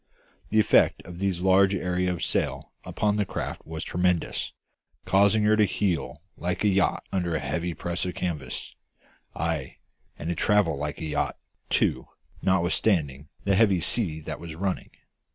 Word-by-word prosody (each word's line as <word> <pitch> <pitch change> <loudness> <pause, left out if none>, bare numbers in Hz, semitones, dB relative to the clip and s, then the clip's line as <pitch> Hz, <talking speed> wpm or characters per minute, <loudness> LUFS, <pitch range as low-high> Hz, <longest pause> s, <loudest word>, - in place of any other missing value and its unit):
The 110 - +3
effect 105 - +4
of 90 0 -9
these 95 -3 0
large 95 +1 +5
areas 90 0 0
of 85 - -3
sail - - -1
upon 105 -1 0
the 105 - +2
craft 95 - -5
was 80 0 -4
tremendous, 90 -1 0 0.5
causing 100 +2 +4
her 105 +1 +5
to 110 -1 +4
heel 85 -7 -1
like 90 +2 -2
a - - +4
yacht 95 -1 +2
under 90 -3 0
a - - 0
heavy 85 +5 -2
press 85 0 -2
of 90 - -4
canvas; 75 -8 -4 0.6
ay, 80 -5 -2 0.4
and 80 - -5
to - - +1
travel 100 -2 +3
like 75 +1 -4
a 80 - -5
yacht, 75 -1 -1 0.3
too, - - +1 0.3
notwithstanding 85 -6 +1 0.2
the 100 - +2
heavy 95 -2 +4
sea 85 -3 -1
that 75 0 -6
was 80 -1 -7
running. 95 +2 -2
90 Hz, 160 wpm, -26 LUFS, 80-100 Hz, 0.6 s, large